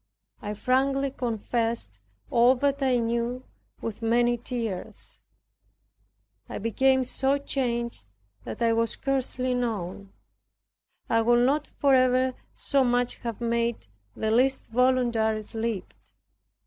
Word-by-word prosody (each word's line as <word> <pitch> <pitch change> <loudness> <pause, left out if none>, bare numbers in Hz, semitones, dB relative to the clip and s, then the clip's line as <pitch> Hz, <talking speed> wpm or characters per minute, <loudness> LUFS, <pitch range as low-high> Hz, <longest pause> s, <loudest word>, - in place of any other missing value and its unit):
I 210 0 -4
frankly 270 +4 +1
confessed 230 - -2 0.3
all 240 +2 +5
that 280 +2 0
I 260 -2 +3
knew 235 +2 -1 0.4
with 225 0 -5
many 240 +1 +3
tears. 235 -5 -5 1.3
I - - -5
became 260 +4 +2
so 265 +2 0
changed 235 - -2 0.4
that 235 - -4
I 230 0 +3
was 230 0 +1
scarcely 255 -1 -1
known. 200 -5 -3 1.0
I 230 - +3
would 240 +1 +4
not 290 +3 +1
for 280 -1 +1
ever 255 0 +3 0.2
so 275 -1 +1
much 245 0 +1 0.2
made 235 0 -1 0.3
the 220 - -1
least 260 +4 +2
voluntary 235 -3 +2
slip. 220 -3 -4
240 Hz, 110 wpm, -26 LUFS, 230-260 Hz, 1.3 s, all